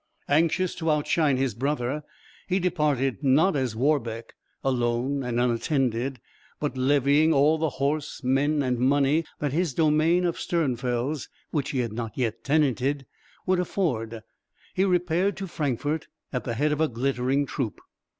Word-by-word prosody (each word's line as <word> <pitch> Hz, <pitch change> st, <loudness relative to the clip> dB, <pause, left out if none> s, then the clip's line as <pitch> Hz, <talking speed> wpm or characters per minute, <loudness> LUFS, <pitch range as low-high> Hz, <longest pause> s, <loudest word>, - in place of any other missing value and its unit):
Anxious 165 Hz, +4 st, +2 dB
to 165 Hz, -1 st, -2 dB
outshine 150 Hz, -1 st, +2 dB
his 130 Hz, -3 st, 0 dB
brother, 135 Hz, +3 st, -1 dB, 0.5 s
he 185 Hz, -, +1 dB
departed 150 Hz, -8 st, 0 dB
not 150 Hz, +8 st, +4 dB
as 130 Hz, -5 st, -1 dB
Warbeck, 115 Hz, -4 st, -1 dB, 0.3 s
alone 125 Hz, +1 st, 0 dB
and 120 Hz, -2 st, -1 dB
unattended, 125 Hz, 0 st, 0 dB, 0.4 s
but 150 Hz, -2 st, -2 dB
levying 145 Hz, +4 st, +3 dB
all 150 Hz, +3 st, +4 dB
the 160 Hz, 0 st, +1 dB
horse, 145 Hz, +1 st, -2 dB
men, 140 Hz, +3 st, +2 dB
and 125 Hz, -2 st, 0 dB
money 140 Hz, +4 st, +3 dB
that 145 Hz, -2 st, -2 dB
his 165 Hz, -4 st, 0 dB
domain 160 Hz, +3 st, +3 dB
of 170 Hz, -, -1 dB
Sternfels 130 Hz, -3 st, -1 dB, 0.2 s
which 145 Hz, -4 st, -1 dB
he 130 Hz, -, 0 dB
had 115 Hz, -3 st, -3 dB
not 115 Hz, -1 st, -5 dB
yet 115 Hz, -3 st, -2 dB
tenanted 140 Hz, -1 st, +1 dB, 0.4 s
would 185 Hz, -1 st, +2 dB
afford, 115 Hz, -, -2 dB, 0.5 s
he 190 Hz, -, +2 dB
repaired 180 Hz, +1 st, +1 dB
to 195 Hz, -, -4 dB
Frankfort 150 Hz, -2 st, -2 dB, 0.3 s
at 125 Hz, -, -2 dB
the 115 Hz, -, -2 dB
head 150 Hz, +5 st, +1 dB
of 150 Hz, +1 st, 0 dB
a 160 Hz, -, +4 dB
glittering 130 Hz, +2 st, 0 dB
troop. 130 Hz, -6 st, -3 dB
140 Hz, 150 wpm, -26 LUFS, 125-155 Hz, 0.5 s, not